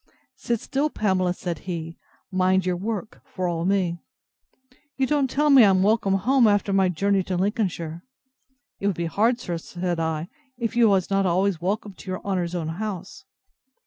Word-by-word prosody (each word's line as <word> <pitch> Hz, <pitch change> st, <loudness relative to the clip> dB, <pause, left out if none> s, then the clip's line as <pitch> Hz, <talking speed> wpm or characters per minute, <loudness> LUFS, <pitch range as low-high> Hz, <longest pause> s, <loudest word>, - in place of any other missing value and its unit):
Sit 235 Hz, -3 st, -2 dB
still, 280 Hz, +6 st, -1 dB
Pamela, 190 Hz, -7 st, +1 dB
said 175 Hz, -2 st, -4 dB
he, 165 Hz, -1 st, -4 dB, 0.4 s
mind 185 Hz, 0 st, +2 dB
your 180 Hz, -1 st, +1 dB
work, 215 Hz, +3 st, -5 dB
for 185 Hz, -1 st, -4 dB
all 170 Hz, -1 st, -2 dB
me.—You 255 Hz, +9 st, -4 dB
don't 280 Hz, -1 st, +1 dB
tell 295 Hz, +3 st, +2 dB
me 270 Hz, -3 st, +8 dB
I 205 Hz, -, +6 dB
am 190 Hz, -1 st, +3 dB
welcome 205 Hz, -2 st, +2 dB
home, 245 Hz, +5 st, +3 dB
after 205 Hz, -1 st, +2 dB
my 190 Hz, -1 st, +3 dB
journey 195 Hz, +3 st, +1 dB
to 185 Hz, 0 st, -3 dB
Lincolnshire. 180 Hz, -5 st, -2 dB, 0.8 s
It 200 Hz, -, -1 dB
would 200 Hz, -, +1 dB
be 170 Hz, -, -1 dB
hard, 225 Hz, +8 st, +1 dB
sir, 175 Hz, -7 st, -4 dB
said 175 Hz, 0 st, -3 dB
I, 160 Hz, 0 st, -2 dB, 0.3 s
if 235 Hz, -2 st, -3 dB
you 235 Hz, -2 st, +5 dB
was 195 Hz, -1 st, +1 dB
not 195 Hz, -1 st, +2 dB
always 180 Hz, 0 st, +1 dB
welcome 200 Hz, +2 st, -2 dB
to 185 Hz, -, -11 dB
your 185 Hz, -, -3 dB
honour's 180 Hz, -3 st, -1 dB
own 165 Hz, -2 st, -2 dB
house. 190 Hz, +1 st, -6 dB
190 Hz, 175 wpm, -24 LUFS, 175-215 Hz, 0.8 s, me